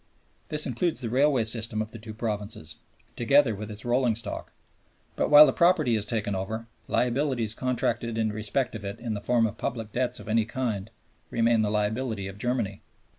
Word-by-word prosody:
This 150 0 0
includes 140 +7 -1
the 115 -3 -3
railway 135 -1 +3
system 110 0 -1
of 110 0 -3
the 115 - -9
two 110 0 -9
provinces, 105 -7 -4 0.4
together 130 0 +4
with 105 +1 -6
its 105 +1 -8
rolling 120 -1 +2
stock. 115 - -3 0.6
But - - 0
while 150 0 +10
the - - +1
property 170 -9 +3
is 105 -1 -2
taken 105 -3 -1
over, 110 +4 -3 0.2
liabilities 125 -3 +1
contracted 120 -2 -1
in 110 -2 0
respect 110 +5 -1
of 110 -2 -7
it 100 +3 -5
in 115 -2 -3
the 105 - -4
form 120 +1 +2
of 110 0 -4
public 115 -3 -3
debts 125 +1 -1
of - - -11
any 110 0 +2
kind 110 -4 -3 0.4
remain 115 -1 +2
the 105 - +1
liability 105 0 -1
of 95 +1 -9
Germany. 115 -5 -2
115 Hz, 185 wpm, -27 LUFS, 105-125 Hz, 0.6 s, while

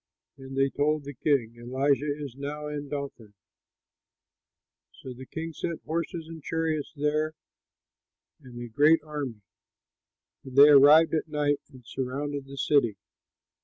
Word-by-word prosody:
And 135 -1 -9
they 135 0 +2
told 150 +1 0
the 145 +1 -7
king, 120 -4 0
"Elisha 135 +4 0
is 140 -5 -7
now 145 +2 -5
in 145 -1 -5
Dothan." 135 -8 -6 1.6
So 130 - -9
the 130 +1 -11
king 165 0 -6
sent 170 +1 -5
horses 165 0 -3
and 165 -1 -9
chariots 160 -1 -2
there 150 +2 0 1.1
and 125 -3 -11
a - - -6
great 150 +7 +4
army. 145 -8 -5 1.0
And 130 -1 -10
they 140 +2 +9
arrived 150 +3 +7
at 160 0 0
night 145 -1 0
and 130 -2 -15
surrounded 140 +3 -4
the 140 0 -10
city. 125 -8 +2
145 Hz, 135 wpm, -27 LUFS, 135-150 Hz, 1.6 s, they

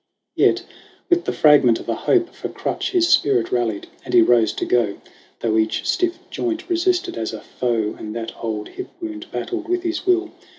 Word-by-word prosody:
Yet, - - +3 0.5
with 350 0 +3
the - - 0
fragment 145 -6 +5
of - - -10
a 115 - 0
hope 350 - +2
for - - -6
crutch, - - -3
His 355 -3 +2
spirit 130 - +3
rallied, 115 -4 -1 0.2
and - - -2
he - - +8
rose 120 -2 +4
to - - -3
go, 115 -5 +1 0.4
Though 110 -1 +1
each 110 0 -1
stiff 355 -2 +1
joint 345 0 -3
resisted 355 - 0
as 110 0 -3
a 110 - -6
foe 115 -4 -1
And 110 +1 -6
that 115 0 -4
old 110 -2 -3
hip 380 - -7
wound 325 -1 -6
battled 345 -2 -4
with 360 0 0
his 340 -1 -2
will. 360 -1 +2
150 Hz, 195 wpm, -21 LUFS, -, 0.5 s, he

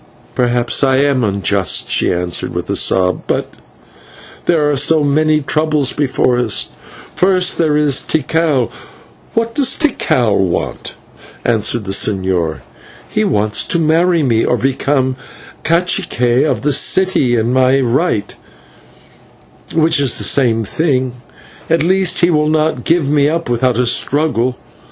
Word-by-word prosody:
"Perhaps 120 +1 +1
I 135 -1 +3
am 140 -2 +1
unjust," 100 -2 0
she - - +2
answered 90 -1 -2
with - - -4
a - - -1
sob, 90 -1 +1
"but - - -2 0.9
there 160 -4 +2
are 145 - +1
so 150 +3 +2
many 155 +2 +1
troubles 150 -1 0
before 130 -3 0
us. 120 -4 -1 0.4
First 185 -1 +1
there 155 -3 +2
is 145 -3 +2
Tikal 155 -4 0 0.3
" - - -29
"What 230 0 -1
does 275 -3 +1
Tikal 125 - 0
want?" 95 -3 -3 0.5
asked 110 -3 +1
the 95 - -5
señor. 95 - -1 0.5
"He - - -1
wants 105 0 +1
to - - 0
marry 165 +1 +2
me, 115 -4 +1
or 125 - 0
to - - -9
become 135 -1 0 0.5
/cacique/ 155 -7 +1
of - - -2
the 145 0 +1
city 165 -5 +2
in 115 +2 0
my 130 +1 +3
right, 125 - -1 1.4
which 160 -1 +2
is 135 -4 +2
the - - 0
same 115 -5 +1
thing; 130 0 -1 0.6
at 165 -1 +2
least 190 +2 +1
he 175 0 +3
will 150 -1 +1
not 155 -5 -1
give 165 -3 +1
me 145 0 +2
up 165 +1 -3
without 120 0 0
a 125 - +1
struggle. 130 -1 0
135 Hz, 145 wpm, -15 LUFS, 120-160 Hz, 1.4 s, I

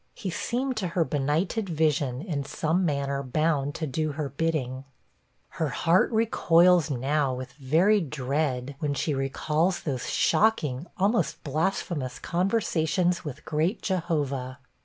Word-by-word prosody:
He 190 - -4
seemed 255 +7 -2
to 195 -4 -1
her 165 - +4
benighted 155 - -1
vision 150 -5 0
in 155 -8 -2
some 160 +6 0
manner 140 -3 -1
bound 145 +1 0
to 160 - -2
do 155 +2 -2
her 145 -1 -3
bidding. 135 -4 -2 0.8
Her 155 - +2
heart 165 - +2
recoils 180 -7 +4
now, 135 +1 0
with 130 0 -7
very 165 +10 +3
dread, 140 -2 -2
when 145 -2 -1
she 155 +1 -1
recalls 155 +6 0
those 130 -6 -3
shocking, 160 -9 +2
almost 205 +5 +1
blasphemous 155 -3 -2
conversations 180 -2 0
with 150 -1 -7
great 165 +7 -1
Jehovah. 145 -8 -1
155 Hz, 130 wpm, -27 LUFS, 140-175 Hz, 0.8 s, her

